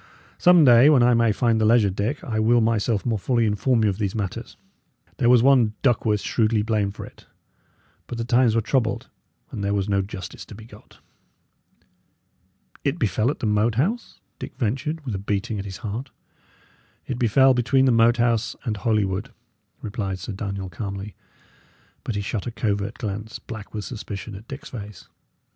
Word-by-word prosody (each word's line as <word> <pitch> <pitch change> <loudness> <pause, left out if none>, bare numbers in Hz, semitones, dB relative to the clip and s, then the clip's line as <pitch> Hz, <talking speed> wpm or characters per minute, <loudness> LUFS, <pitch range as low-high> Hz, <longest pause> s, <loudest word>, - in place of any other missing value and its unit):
Some 175 -3 +6
day, 125 +2 +7
when 135 -5 +5
I 125 0 +5
may 115 -1 +3
find 115 +1 +1
the - - +3
leisure, 110 -3 +4
Dick, 105 +10 -3
I 110 -3 -2
will 115 +2 +4
myself 110 -1 0
more 115 -4 0
fully 120 +2 +1
inform 110 +3 +1
you 105 - +3
of 95 - -7
these 100 -1 -2
matters. 100 -4 -5 0.6
There 120 - +2
was 120 -2 +6
one 125 -5 +4
Duckworth 110 -5 +2
shrewdly 110 -2 +1
blamed 105 -3 -1
for - - -7
it; - - -17 0.8
but 120 - -6
the 115 - -3
times 120 -1 +3
were 115 - +3
troubled, 115 0 -1 0.4
and 100 - -5
there 100 +1 0
was 100 -1 -1
no 100 -1 +1
justice 95 -1 -8
to 105 - -12
be 110 +1 -12
got." - - -17 1.9
"It 140 +3 0
befell 110 - +1
at 145 - -4
the - - -1
Moat 105 +2 +1
House?" 205 - -2 0.2
Dick - - -8
ventured, 140 +6 -2
with 120 - -3
a 95 - -3
beating 105 +2 -2
at 100 - -5
his 95 -2 -7
heart. 115 +6 -4 1.0
"It 125 -2 -4
befell 130 +3 +4
between 130 +2 +2
the 130 - +4
Moat 115 +1 +4
House 120 -1 +1
and 110 -5 -2
Holywood," 100 -1 -1 0.5
replied 100 -4 -3
Sir 95 +4 -6
Daniel, 100 -1 -4
calmly; 100 +2 -6 0.9
but 115 - -3
he 100 - -1
shot 100 +1 -4
a - - -3
covert 100 -3 -2
glance, 105 +1 -5
black 110 -3 -9
with 105 -2 -5
suspicion, 105 -3 -7
at 100 +4 -11
Dick's 135 +2 -8
face. 105 -5 -9
110 Hz, 185 wpm, -23 LUFS, 100-120 Hz, 1.9 s, day